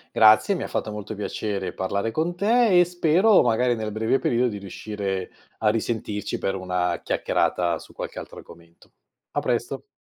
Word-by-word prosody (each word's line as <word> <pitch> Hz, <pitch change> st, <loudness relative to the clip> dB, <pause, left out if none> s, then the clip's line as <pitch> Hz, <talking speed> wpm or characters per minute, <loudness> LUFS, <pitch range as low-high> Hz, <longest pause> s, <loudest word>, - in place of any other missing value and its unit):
Grazie, 110 Hz, -, +6 dB
mi -, -, -3 dB
ha -, -, -4 dB
fatto 110 Hz, -, -3 dB
molto 105 Hz, +1 st, -6 dB
piacere 100 Hz, -2 st, -3 dB
parlare 100 Hz, +4 st, -2 dB
con 170 Hz, +6 st, -1 dB
te 220 Hz, -2 st, +4 dB
e 175 Hz, -, +6 dB
spero 180 Hz, +4 st, +4 dB
magari, 120 Hz, +1 st, +2 dB
nel 110 Hz, -1 st, -4 dB
breve 110 Hz, +4 st, +1 dB
periodo, 125 Hz, -1 st, +1 dB
di 105 Hz, -3 st, -4 dB
riuscire 100 Hz, -1 st, -4 dB, 0.3 s
a 110 Hz, -, 0 dB
risentirci 105 Hz, -1 st, -1 dB
per 95 Hz, -, -2 dB
una 90 Hz, -1 st, -1 dB
chiacchierata 85 Hz, -2 st, 0 dB
su -, -, -14 dB
qualche -, -, -7 dB
altro -, -, -8 dB
argomento. 85 Hz, 0 st, -16 dB, 0.4 s
A -, -, -1 dB
presto. -, -, -2 dB
110 Hz, 170 wpm, -24 LUFS, 100-135 Hz, 0.4 s, Grazie